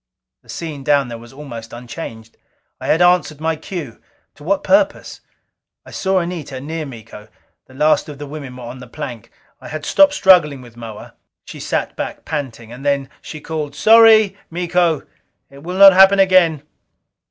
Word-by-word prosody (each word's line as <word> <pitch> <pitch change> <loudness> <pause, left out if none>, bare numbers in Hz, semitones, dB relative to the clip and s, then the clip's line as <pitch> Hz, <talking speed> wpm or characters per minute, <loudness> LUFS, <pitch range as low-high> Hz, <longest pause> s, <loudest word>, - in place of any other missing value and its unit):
The - - -28
scene 155 -5 -6
down 140 -2 +2
there 115 -1 -7
was 120 0 -14
almost 120 -5 -10
unchanged. 120 -2 -9 0.4
I - - -7
had 165 +3 +3
answered 175 -4 +2
my 160 +1 -1
cue. 155 -6 -8 0.3
To 145 - -17
what 195 +5 0
purpose? 295 0 +1 0.6
I - - -13
saw 190 0 -1
Anita 170 -7 -4
near 155 +3 -5
Miko. 110 -4 -12 0.4
The 130 - -17
last 155 +2 +2
of 145 - -9
the 145 - -7
women 140 -3 -9
were 125 - -10
on 120 +2 -9
the 125 - -11
plank. 115 -2 -8 0.3
I - - -10
had 155 -1 -6
stopped 290 0 +4
struggling 175 - +4
with 120 -2 -15
Moa. 115 -3 -10 0.3
She - - -10
sat - - -3
back, - - -6
panting. 120 -5 -5
And 125 +3 -10
then 140 -1 -1
she 155 - -9
called: 150 -3 -5
"Sorry, 220 +2 +6
Miko. 175 -2 0 0.5
It 140 0 -14
will 180 +4 -6
not 195 0 +9
happen 195 +1 +6
again." 185 -6 +3
150 Hz, 175 wpm, -18 LUFS, 130-180 Hz, 0.6 s, not